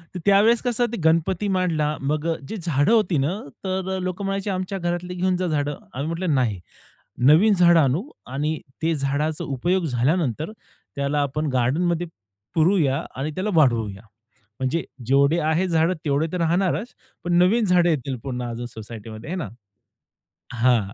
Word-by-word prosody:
तर - - -3
त्यावेळेस 205 +4 +5
कसं 245 -1 +1
ते 235 - -3
गणपती 165 +5 +2
मांडला, 155 -5 0
मग 150 +3 -1 0.2
जे 220 - -4
झाडं 160 -3 +1
होती 210 -8 +3
ना, 135 +2 +1 0.3
तर 190 0 -2
लोकं 185 +2 -3
म्हणायचे, 195 +1 -2
"आमच्या 185 +1 -2
घरातली 175 0 -3
घेऊन 185 +1 +1
जा 185 - -1
झाडं." 145 -2 -1 0.2
आम्ही 140 +4 -3
म्हटलं, 165 0 -1
"नाही. 115 -7 0 0.7
नवीन 180 +9 +6
झाडं 175 -3 +5
आणू 140 +2 +2 0.3
आणि 150 +3 -1 0.2
ते 165 +1 +1
झाडाचा 145 +2 -1
उपयोग 175 +7 0
झाल्यानंतर, 150 - 0 0.4
त्याला 140 +1 0
आपण 150 +2 -1
गार्डनमध्ये 165 +8 +1 0.5
पुरूया 160 -5 +2
आणि 140 +4 -3
त्याला 195 +3 -1
वाढवूया." 115 -9 +2 0.6
म्हणजे 130 +5 0 0.2
जेवढे 140 +5 +4
आहेत 175 +4 +1
झाडं 165 +1 +2
तेवढे 145 +2 +1
तर 180 - -1
राहणारच. 185 +7 0 0.3
पण 175 - -1
नवीन 215 +6 +4
झाडं 180 -2 +4
येतील 135 -4 -1
पुन्हा 125 -3 -4
अजुन 120 +1 -5
सोसायटीमध्ये, 110 +2 -9
है 180 - -2
ना? 175 -6 -4 1.0
हां. 120 -1 +3
160 Hz, 155 wpm, -23 LUFS, 140-185 Hz, 1.0 s, नवीन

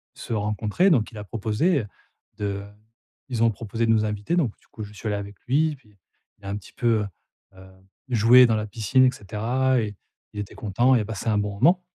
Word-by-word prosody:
se - - -6
rencontrer. 105 - +1
Donc 120 -9 +2
il 110 - -11
a - - -6
proposé, 115 - 0
heu, 105 - -8 0.5
de 100 -1 -3 0.7
ils 120 -3 -2
ont 115 - +5
proposé 115 +2 -3
de - - +4
nous 110 -1 +3
inviter. 105 +9 -2
Donc 130 -11 0
du - - -30
coup, 110 - -8
je 105 0 -10
suis 105 - -7
allé 105 - 0
avec 100 0 -7
lui 155 +5 +2
et - - -9
puis, 105 -6 -25 0.4
il 100 - -16
a - - -4
un 100 - -2
petit 105 - -14
peu, 115 -2 +2 0.6
heu - - -19
heu, 95 0 -14 0.4
joué 120 +2 +7
dans 115 - +2
la 105 0 -3
piscine 115 +5 +2
et 130 - +4
cetera 120 +5 0
et 105 -2 -4 0.4
il 105 - -6
était 105 - -9
content 120 +5 +2
et - - +4
a - - -4
passé 110 +1 -4
un 105 - +2
bon 105 0 -2
moment. 170 - +4
110 Hz, 235 wpm, -24 LUFS, 105-125 Hz, 0.7 s, joué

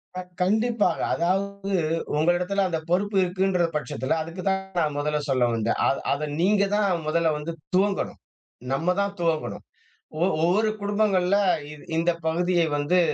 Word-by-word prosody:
க - - -3 0.2
கண்டிப்பாக, 215 -1 +2
அதாவது 195 +3 -1 0.4
உங்களிடத்தல 180 +5 +1
அந்த 165 -2 -1
பொறுப்பு 200 +3 +1
இருக்குன்ற 185 -1 +1
பட்சத்துல 140 0 -1
அதுக்கு 165 +3 -6
தான் 190 0 0 0.2
நான் 150 -3 0
முதல்ல 150 +1 0
சொல்ல 130 -2 +3
வந்தேன். 115 0 0
அத - - 0
அத 150 +2 -3
நீங்க 200 +2 +3
தான் 185 -6 +1
முதல்ல 165 0 +2
வந்து 160 +3 -5 0.2
துவங்கணும். 195 +1 0 0.5
நம்ம 170 +6 +1
தான் 200 0 -2
துவங்கணும். 165 -2 -1 0.6
ஒ - - +4 0.2
ஒவ்வொரு 205 +6 +3
குடும்பங்கள்ல, 200 -2 +2 0.3
இது 150 - -11 0.2
இந்த 170 +1 +2 0.2
பகுதியை 175 +1 +2
வந்து 155 +5 +2
180 Hz, 140 wpm, -25 LUFS, 160-200 Hz, 0.6 s, ஒ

